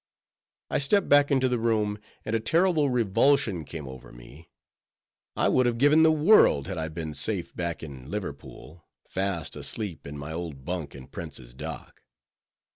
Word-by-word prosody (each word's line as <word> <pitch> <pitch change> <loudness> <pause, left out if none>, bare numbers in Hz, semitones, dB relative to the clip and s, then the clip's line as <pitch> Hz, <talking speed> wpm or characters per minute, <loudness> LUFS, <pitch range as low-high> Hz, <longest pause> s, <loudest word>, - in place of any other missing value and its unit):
I - - +1
stepped 180 +8 +2
back 145 0 +6
into 130 -2 +3
the 125 -1 0
room, 110 -2 0 0.3
and 110 - -1
a - - +2
terrible 160 +4 +2
revulsion 120 - +2
came 75 -1 -8
over 65 -1 -10
me: 65 +7 -14 0.9
I - - +2
would 130 -1 +3
have 120 -1 0
given 145 +5 +5
the 160 0 +6
world 155 - +5
had 95 -1 -4
I 80 - -2
been 80 -1 -5
safe - - -1
back 85 -2 -3
in 70 -3 -9
Liverpool, 85 -3 -7 0.2
fast 95 -4 -2
asleep 100 -10 -5
in 75 +1 -7
my 70 +2 -6
old 80 -6 -6
bunk 85 -5 -4
in 65 -2 -10
Prince's 65 -6 -9
Dock. 65 - -8
95 Hz, 165 wpm, -27 LUFS, 75-130 Hz, 0.9 s, back